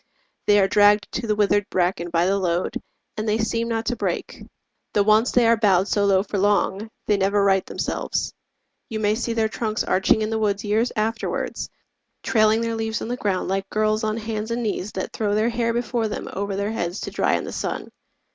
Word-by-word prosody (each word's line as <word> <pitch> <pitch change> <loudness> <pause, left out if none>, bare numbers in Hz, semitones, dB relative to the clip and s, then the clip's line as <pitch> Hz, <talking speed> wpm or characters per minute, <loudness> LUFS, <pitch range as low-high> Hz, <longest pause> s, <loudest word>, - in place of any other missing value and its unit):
They 205 - +6
are 195 - +4
dragged 205 +1 +4
to 235 - -3
the 210 - +1
withered 205 -1 +2
bracken 175 -1 0
by 170 0 +2
the 195 +2 +1
load, 175 -1 -1 0.4
And 215 0 -2
they 210 - +2
seem 230 +1 -1
not 225 -1 -2
to 245 - -1
break; - - -3 0.5
though 205 - +3
once 215 +3 +4
they 245 -1 +4
are 230 0 +5
bowed 200 -4 +3
So 205 -1 +2
low 195 -1 +3
for 205 -1 -3
long, 205 +1 +1 0.2
they 210 - +2
never 200 +1 +2
right 195 -1 +3
themselves: - - -3 0.6
You 220 - -3
may 210 -1 +2
see 235 +1 -2
their 225 -1 +1
trunks 220 0 -2
arching 195 +3 +2
in 215 - -2
the 220 - 0
woods 205 -1 0
Years 220 +3 +1
afterwards, 220 +2 -2 0.5
trailing 215 0 +3
their 230 0 -1
leaves 225 0 -2
on - - -5
the 245 - -1
ground 200 -6 -1
Like 195 +1 -2
girls 215 +1 +1
on 215 0 -1
hands 220 -1 -4
and 235 +1 -2
knees 210 -2 -2
that 190 - -4
throw 205 -2 0
their 220 +2 +2
hair 230 0 0
Before 235 -1 -1
them 210 - -5
over 200 0 -3
their 200 +2 -1
heads 175 -3 -3
to - - -5
dry - - +1
in - - -2
the - - -6
sun. - - -4
215 Hz, 215 wpm, -23 LUFS, 200-225 Hz, 0.6 s, They